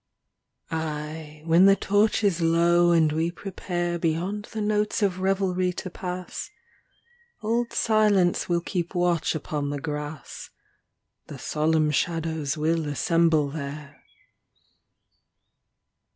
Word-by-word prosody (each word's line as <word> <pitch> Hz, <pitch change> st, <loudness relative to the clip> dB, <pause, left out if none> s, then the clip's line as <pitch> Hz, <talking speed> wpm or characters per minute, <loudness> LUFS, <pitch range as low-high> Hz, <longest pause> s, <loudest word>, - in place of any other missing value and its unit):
XXII 160 Hz, -, -1 dB
Aye, 155 Hz, 0 st, -6 dB
when 170 Hz, +4 st, +6 dB
the 195 Hz, -, +7 dB
torch 205 Hz, +3 st, +2 dB
is 185 Hz, -4 st, +2 dB
low 170 Hz, +1 st, +4 dB
and 160 Hz, -2 st, +4 dB
we 160 Hz, +2 st, 0 dB
prepare 175 Hz, -1 st, -3 dB
Beyond 180 Hz, +6 st, -1 dB
the 220 Hz, -, -7 dB
notes 210 Hz, 0 st, 0 dB
of 185 Hz, -2 st, +1 dB
revelry 185 Hz, -1 st, +1 dB
to 185 Hz, 0 st, -6 dB
pass 180 Hz, 0 st, -6 dB, 0.9 s
Old 235 Hz, +2 st, 0 dB
Silence 210 Hz, -6 st, +2 dB
will 170 Hz, -1 st, +1 dB
keep 175 Hz, 0 st, -3 dB
watch 175 Hz, -3 st, +1 dB
upon 150 Hz, -1 st, -3 dB
the 145 Hz, 0 st, -3 dB
grass, 150 Hz, +1 st, -6 dB, 0.8 s
The -, -, -8 dB
solemn 155 Hz, 0 st, +1 dB
shadows 160 Hz, -3 st, -1 dB
will 160 Hz, +1 st, 0 dB
assemble 160 Hz, 0 st, +2 dB
there. 145 Hz, 0 st, -7 dB
170 Hz, 115 wpm, -25 LUFS, 155-185 Hz, 0.9 s, the